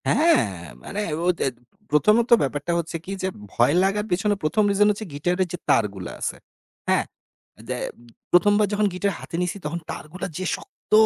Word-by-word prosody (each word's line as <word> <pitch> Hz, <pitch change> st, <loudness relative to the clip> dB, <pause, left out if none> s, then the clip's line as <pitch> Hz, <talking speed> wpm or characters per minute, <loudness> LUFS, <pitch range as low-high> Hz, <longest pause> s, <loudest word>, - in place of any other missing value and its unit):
হ্যাঁ, 125 Hz, -, +3 dB, 0.3 s
মানে 205 Hz, -, -4 dB, 0.2 s
ও -, -, +2 dB
ত্যাত 135 Hz, -, 0 dB, 0.4 s
প্রথমত 210 Hz, -, +4 dB
ব্যাপারটা 145 Hz, +4 st, -1 dB
হচ্ছে 165 Hz, 0 st, -3 dB
কি? 195 Hz, -, -6 dB
যে, 185 Hz, -, 0 dB, 0.3 s
ভয় 120 Hz, +5 st, +4 dB
লাগার 205 Hz, +2 st, +1 dB
পেছনে 205 Hz, +4 st, +2 dB
১ম 180 Hz, +8 st, +2 dB
রিজন 205 Hz, +1 st, +4 dB
হচ্ছে 210 Hz, +1 st, -4 dB
গিটারের 180 Hz, +6 st, 0 dB
যে, -, -, -2 dB
তারগুলা 100 Hz, -5 st, +1 dB
আছে। -, -, -2 dB, 0.5 s
হ্যাঁ? -, -, +3 dB, 0.6 s
যে, -, -, -1 dB, 0.5 s
প্রথমবার 205 Hz, +4 st, +5 dB
যখন 210 Hz, +1 st, +2 dB
গিটার 200 Hz, +2 st, 0 dB
হাতে -, -, -7 dB
নিছি, 180 Hz, +2 st, -1 dB
তখন 165 Hz, +3 st, -2 dB
তারগুলা 155 Hz, +7 st, -6 dB
যে, 185 Hz, -, -3 dB
শক্ত! -, -, -18 dB
180 Hz, 165 wpm, -24 LUFS, 150-205 Hz, 0.6 s, প্রথমবার